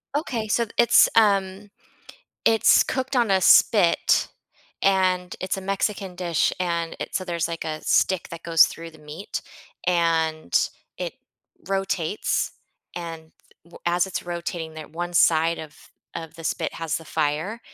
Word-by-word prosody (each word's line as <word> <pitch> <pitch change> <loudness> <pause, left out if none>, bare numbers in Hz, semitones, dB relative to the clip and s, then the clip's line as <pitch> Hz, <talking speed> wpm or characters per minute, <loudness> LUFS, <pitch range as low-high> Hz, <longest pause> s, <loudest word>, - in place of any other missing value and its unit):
Okay, 240 -7 -2
so 235 +2 +1
it's, 235 - +6
um 200 -2 +2 0.8
it's 225 -1 +5
cooked 260 +1 -3
on 240 -4 +2
a 190 -1 +4
spit, 185 -3 +4 0.5
and 185 -2 +1
it's 185 - -2
a - - -5
Mexican 195 0 -2
dish, 175 -3 +1
and 170 -2 -2
it - - -6
so 185 - -1
there's, 170 -2 -2
like, 165 -1 -5
a 155 0 -4
stick 190 -2 +1
that 170 -1 -8
goes 165 -1 +6
through 165 0 -7
the 160 - -17
meat, 150 +6 -7 0.4
and 160 - +1 0.3
it - - -5 0.5
rotates, 195 -2 -1 0.4
and 165 -2 -7 0.3
w 170 - -15
as 175 +1 +2
it's 190 - -4
rotating, 170 -2 -5
that 155 -1 -9
one 175 +1 -4
side 165 -1 +3
of 155 -1 -9 0.4
of 160 -1 -7
the 165 - -10
spit - - -2
has 165 -2 -2
the 165 - -8
fire, 160 +9 -2
175 Hz, 150 wpm, -24 LUFS, 165-195 Hz, 0.8 s, it's